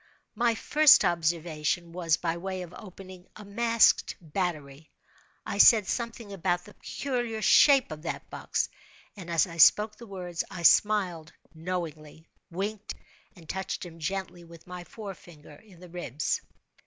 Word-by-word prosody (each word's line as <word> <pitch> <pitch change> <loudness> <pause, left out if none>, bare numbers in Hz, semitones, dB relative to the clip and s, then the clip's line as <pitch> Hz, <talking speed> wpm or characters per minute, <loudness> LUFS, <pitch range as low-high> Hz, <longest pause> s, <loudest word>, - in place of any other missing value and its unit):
My 235 +1 +1
first 305 +5 +5
observation 170 0 -1
was 170 -2 0
by 165 -1 -2
way 185 +1 -5
of 175 0 -12
opening 185 -2 -12
a 210 - -11
masked 230 +3 +2
battery. 155 -4 -5 0.6
I 200 - -4
said 215 -1 +7
something 230 -1 -4
about 180 -1 -1
the 210 - -14
"peculiar 240 -5 -4
shape 275 - +5
of 155 -1 -7
that 170 - -6
box"; - - -2 0.5
and, 185 -4 -10
as 165 -2 +3
I 170 -2 -10
spoke 210 +6 +5
the 235 - -12
words, 180 -3 -5
I 175 -2 -8
smiled 180 -5 +3 0.2
knowingly, 160 -2 -6 0.2
winked, 200 +4 -5 0.4
and 170 -4 -16
touched 190 +1 -4
him 165 -1 -12
gently 180 +1 -4
with 170 -1 -15
my 180 0 -9
forefinger 175 -9 -11
in 195 -3 -19
the 180 - -12
ribs. 155 -5 -3
180 Hz, 145 wpm, -27 LUFS, 165-210 Hz, 0.6 s, said